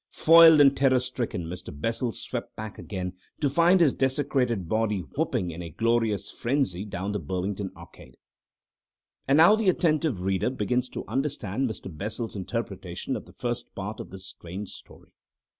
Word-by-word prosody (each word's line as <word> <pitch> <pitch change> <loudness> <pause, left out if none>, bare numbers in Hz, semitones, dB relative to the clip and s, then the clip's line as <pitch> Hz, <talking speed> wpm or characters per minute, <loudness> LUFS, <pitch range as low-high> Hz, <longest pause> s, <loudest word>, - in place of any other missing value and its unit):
Foiled 165 -1 +7
and 140 -1 +6
terror 135 -1 +4
stricken, 125 -7 -3
Mr. 90 +2 -7
Bessel 115 - -2
swept - - -6
back 110 -1 -7
again, 90 -3 -5 0.3
to 145 -3 +1
find 170 +5 +5
his 160 -6 +4
desecrated 130 - 0
body 110 -1 0
whooping 85 +3 -2
in 85 +2 -7
a 85 - -6
glorious 115 +2 0
frenzy 120 -7 -1
down 100 -1 -4
the 105 - -2
Burlington 95 +4 -3
Arcade.... 75 -7 -14 1.1
And 135 +2 +4
now 170 +7 +8
the 220 -3 +2
attentive 155 - +1
reader 95 +4 +1
begins 125 +1 -1
to - - -6
understand 135 -4 -1
Mr. 95 -5 -8
Bessel's 110 +6 -4
interpretation 95 -2 -4
of - - -6
the - - -16
first 120 0 -4
part 105 +3 -5
of - - -7
this 95 +1 -10
strange 95 +2 -8
story. - - -13
110 Hz, 160 wpm, -26 LUFS, 95-135 Hz, 1.1 s, now